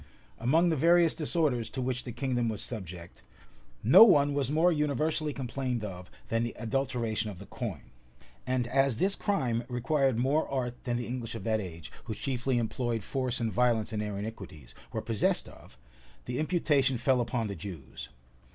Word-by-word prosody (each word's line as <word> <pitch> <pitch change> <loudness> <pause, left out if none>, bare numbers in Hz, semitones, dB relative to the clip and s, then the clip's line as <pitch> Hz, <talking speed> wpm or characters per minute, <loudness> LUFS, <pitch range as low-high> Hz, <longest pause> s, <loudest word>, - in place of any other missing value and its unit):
Among 160 +9 +3
the 160 - +2
various 170 +2 +4
disorders 150 -7 0
to 135 - -6
which 125 0 -2
the 120 - -5
kingdom 120 -2 -1
was 110 - -3
subject, 90 -6 -8 0.6
no 125 - +9
one 145 -9 +5
was 140 -3 0
more 160 +4 +4
universally 150 0 0
complained 130 -3 -3
of 90 -3 -7 0.2
than 115 0 +1
the 120 0 -3
adulteration 115 -3 -1
of 100 - -8
the 100 - -10
coin; - - -6 0.6
and 130 -1 +1
as 135 0 +2
this 195 +7 +2
crime 125 - 0
required 135 0 +1
more 135 +6 +1
art 125 -3 -3
than 120 -2 0
the 120 - -3
English 120 -2 -5
of 115 - -6
that 110 -1 +1
age, 85 -4 -8
who 110 -2 -4
chiefly 130 0 -1
employed 120 -1 -1
force 130 0 -2
and 115 -2 -1
violence 120 -3 +2
in 105 - -1
their 105 -1 -3
iniquities, 95 - -8 0.2
were 110 - -3
possessed 110 -1 +1
of, - - -15 0.5
the 125 0 -3
imputation 145 -5 +2
fell 125 +1 +2
upon 120 -1 -1
the 100 - -3
Jews. 85 -7 -8
125 Hz, 175 wpm, -30 LUFS, 110-140 Hz, 0.6 s, no